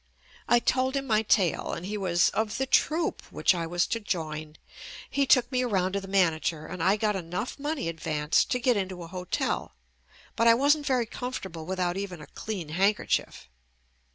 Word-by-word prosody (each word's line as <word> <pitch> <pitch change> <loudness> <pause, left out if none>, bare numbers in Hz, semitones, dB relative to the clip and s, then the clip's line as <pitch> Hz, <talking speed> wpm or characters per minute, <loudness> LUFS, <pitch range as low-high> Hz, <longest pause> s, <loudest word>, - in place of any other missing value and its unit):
I 240 - +5
told 255 +3 +1
him 275 0 -1
my 215 -4 +2
tale 195 -5 +1
and 165 - -5
he 205 +2 -4
was 180 -4 +2
"of 220 -1 -2
the 265 - 0
troupe" 315 +5 +1
which - - +3
I 170 -2 -3
was 175 +1 +1
to 230 - -2
join. 155 -6 -4 0.5
He 280 -1 0
took 245 -2 +4
me 255 -1 +1
around 190 -7 +1
to 200 - -1
the 195 - -9
manager 165 -4 +1
and 175 - -6
I 190 +4 +4
got 210 -1 0
enough 180 - -4
money 290 - -2
advanced 155 -2 0
to 250 - 0
get 245 0 +2
into 185 -3 -3
a - - -8
hotel, 180 +1 -3 0.6
but 230 - +3
I 230 - +8
wasn't 290 +3 +3
very 255 -4 +2
comfortable 190 -10 -6
with 190 0 -3
out 175 0 0
even 195 -4 -5
a 150 - -10
clean 190 -8 -6
handkerchief. 190 - 0
195 Hz, 190 wpm, -27 LUFS, 175-245 Hz, 0.6 s, I